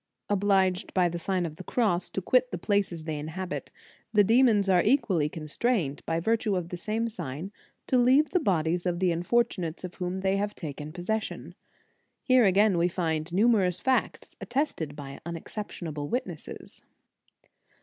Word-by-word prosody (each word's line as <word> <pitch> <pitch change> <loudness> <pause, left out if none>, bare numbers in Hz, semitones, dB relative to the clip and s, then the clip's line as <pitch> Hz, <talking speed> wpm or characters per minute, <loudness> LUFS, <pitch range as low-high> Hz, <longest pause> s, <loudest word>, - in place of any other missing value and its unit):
* - - -57
Obliged 190 -1 +1
by 180 -2 +4
the 175 0 -4
Sign 185 +1 -1
of 155 -1 -6
the 185 - -8
Cross 185 -5 0
to 190 - -4
quit 255 +5 +3
the 180 - -4
places 185 -3 0
they 155 -2 -3
inhabit, 175 +5 -5 0.4
the 210 -2 +5
demons 225 -2 +4
are 180 -2 +5
equally 190 - +2
constrained, 155 - -1
by 165 0 0
virtue 220 +2 +1
of 175 -2 -3
the 180 - -4
same 215 +6 -2
sign, 180 - -5 0.3
to 255 - +2
leave 260 +5 +4
the 365 - +3
bodies 175 - 0
of 175 -1 0
the 180 0 +2
unfortunates 175 -1 0
of 180 -1 -6
whom 185 +1 -4
they 190 +1 +1
have 205 +1 -2
taken 150 -2 -6
possession. 200 +6 -4 0.7
Here 255 -3 +5
again 195 -1 +4
we 170 - +3
find 165 -2 -2
numerous 190 -3 +3
facts 260 -1 -1
attested 240 - -2
by 140 -2 -8
unexception 170 +2 -6
able 145 -1 -5
witnesses. 185 -10 -5
185 Hz, 165 wpm, -28 LUFS, 165-215 Hz, 0.7 s, the